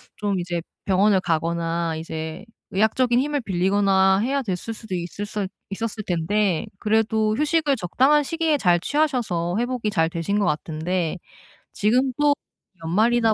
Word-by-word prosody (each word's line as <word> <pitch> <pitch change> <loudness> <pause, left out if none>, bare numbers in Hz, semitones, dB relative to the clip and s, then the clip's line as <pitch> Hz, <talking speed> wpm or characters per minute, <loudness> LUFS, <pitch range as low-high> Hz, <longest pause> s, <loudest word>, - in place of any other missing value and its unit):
좀 200 -2 -1
이제 175 -1 -3 0.2
병원을 195 +1 +4
가거나 165 0 -1
이제 160 +3 -6 0.3
의학적인 240 +5 +2
힘을 290 +1 -1
빌리거나 190 0 +3
해야 270 +6 0
됐을 210 -1 -4
수도 220 -3 -9
있을 180 +3 -4
수 205 -2 -3 0.2
있었을 215 +2 -4
텐데 180 +2 0
그래도 220 0 +1
휴식을 300 -2 +2
적당한 265 - +3
시기에 325 0 0
잘 180 -9 +3
취하셔서 235 - 0
회복이 245 -2 -1
잘 165 -6 +1
되신 170 +5 -2
것 205 - +2
같은데 160 +3 -1 0.6
지금 250 +5 +2
또 295 -1 +5 0.5
연말이다 225 +6 +3
205 Hz, 310 characters per minute, -23 LUFS, 175-240 Hz, 0.6 s, 또